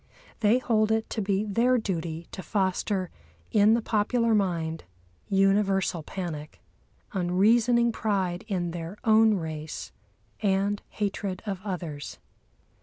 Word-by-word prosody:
They 220 +2 +4
hold 220 -4 +1
it 220 0 +1
to 220 - -1
be 200 +1 0
their 235 +5 +3
duty 170 -6 -3
to 190 - -6
foster 190 -1 -1 0.4
in 215 +1 +5
the 235 - -1
popular 230 +2 +1
mind 170 -6 0 0.5
universal 195 -2 +2
panic, 155 -3 -6 0.5
unreasoning 225 +6 +3
pride 195 -6 -1
in 180 -5 -1
their 170 +3 -6
own 220 -2 +5
race, 160 -3 -5 0.5
and 200 0 +1
hatred 200 -2 -3
of 195 -3 -4
others. 170 -7 -5
195 Hz, 115 wpm, -27 LUFS, 175-215 Hz, 0.5 s, in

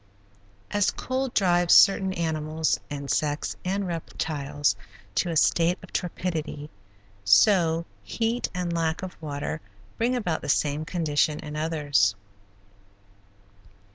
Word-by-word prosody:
As 205 -1 +2
cold 260 0 -2
drives 175 -3 +4
certain 195 -1 +6
animals, 160 -2 -1
insects, 145 +1 -2
and 195 +2 -1
reptiles 145 - -2 0.4
to 110 - 0
a 165 - -2
state 170 +3 +3
of - - -13
torpidity, 160 -4 -3 0.5
so 165 - +4 0.2
heat 225 - -1
and 180 -2 -3
lack 165 +1 -1
of 185 - -6
water 150 +1 -4 0.4
bring 245 +2 +1
about 180 -10 -1
the - - -6
same 150 +1 +1
condition 155 -3 0
in 150 -1 -7
others. 145 -10 +1
160 Hz, 110 wpm, -26 LUFS, 150-180 Hz, 0.5 s, certain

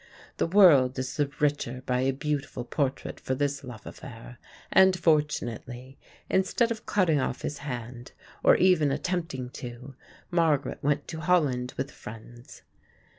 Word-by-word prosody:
The - - +1
world 160 -9 +6
is 130 0 -3
the 145 -2 0
richer 140 -4 -1
by 125 -1 0
a 130 +1 +2
beautiful 140 -3 -3
portrait 135 +1 -2
for 130 - -2
this 140 +1 -1
love 120 -5 -10
affair, - - -10 0.3
and 190 -1 +6
fortunately, 135 -5 -1 0.3
instead 210 +5 +1
of 220 -1 -5
cutting 175 -7 +2
off - - -3
his 145 - -4
hand 120 -3 -7 0.3
or - - +7
even 175 -6 +4
attempting 160 -6 -3
to, 125 +2 -8 0.4
Margaret 160 -5 +1
went 145 0 0
to 160 - -5
Holland 150 -8 +1
with 135 +1 -3
friends. 115 +3 -12
140 Hz, 140 wpm, -27 LUFS, 125-160 Hz, 0.4 s, or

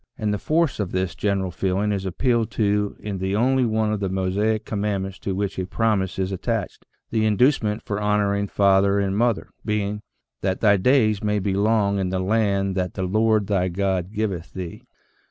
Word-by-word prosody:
And 105 -1 -1
the 105 - -2
force 160 -4 +1
of 100 -4 -2
this 95 -2 -1
general 100 -3 -1
feeling 95 +3 0
is 95 -2 -2
appealed 115 +3 +1
to 105 -1 0
in 100 -3 -4
the 95 +1 -1
only 130 +3 +3
one 110 -1 +1
of 105 - -2
the 100 -1 -1
Mosaic 100 +4 0
commandments 100 -2 -2
to 95 - -3
which 100 -1 -2
a 90 - -2
promise 105 -4 0
is 95 0 -1
attached, 95 - -3 0.2
the 110 -1 +1
inducement 110 0 +2
for 105 0 -3
honor 105 -1 +2
ing 100 0 -1
father 100 0 +3
and 100 -1 0
mother 115 0 0
being 105 -1 -2 0.2
" - - -61
that 95 -1 -1
thy 105 -2 +4
days 110 -1 +3
may 105 0 +1
be 100 -1 -1
long 100 0 +2
in 95 -1 -1
the 95 - -1
land 100 0 +1
that 90 -2 -2
the 95 - -2
Lord 110 +2 +2
thy 95 -2 +1
God 95 0 -1
giveth 100 -6 -3
thee." 90 -3 -7
100 Hz, 195 wpm, -23 LUFS, 95-110 Hz, 0.2 s, thy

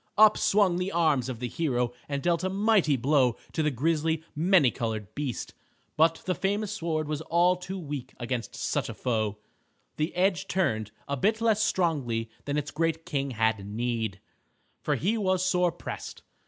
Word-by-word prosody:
Up 215 0 +8
swung 195 -4 +3
the 180 +2 -2
arm 160 -5 +3
of 125 - -4
the 125 - -2
hero, 125 -3 -1 0.2
and 140 -1 -2
dealt 175 0 +1
a 185 - +1
mighty 195 -6 +3
blow 130 -2 +3 0.2
to 160 - -1
the 150 - +2
grisly, 160 +4 0
many 165 -4 +4
colored 110 -3 -4
beast. 145 -3 -4 0.4
But 165 +1 +3
the 185 - +1
famous 205 +2 -1
sword 165 -6 -2
was 150 0 -2
all 175 +3 +3
too 185 +1 -6
weak 145 -6 -6
against 120 -2 -3
such - - -1
a - - -6
foe. 110 -4 -1 0.6
The 155 +2 0
edge 180 -3 +1
turned 110 - 0 0.2
and 140 -2 -3
bit 220 +2 +2
less 220 -2 +2
strongly 135 - 0
than 145 +1 -1
its 145 -1 -2
great 165 +1 -1
king 140 -2 -1
had 110 -4 0
need, 110 -1 -2 0.6
for - - 0
he 220 +6 0
was 185 -2 +1
sore 180 -2 +2
pressed. 170 - -7
155 Hz, 175 wpm, -28 LUFS, 125-180 Hz, 0.6 s, Up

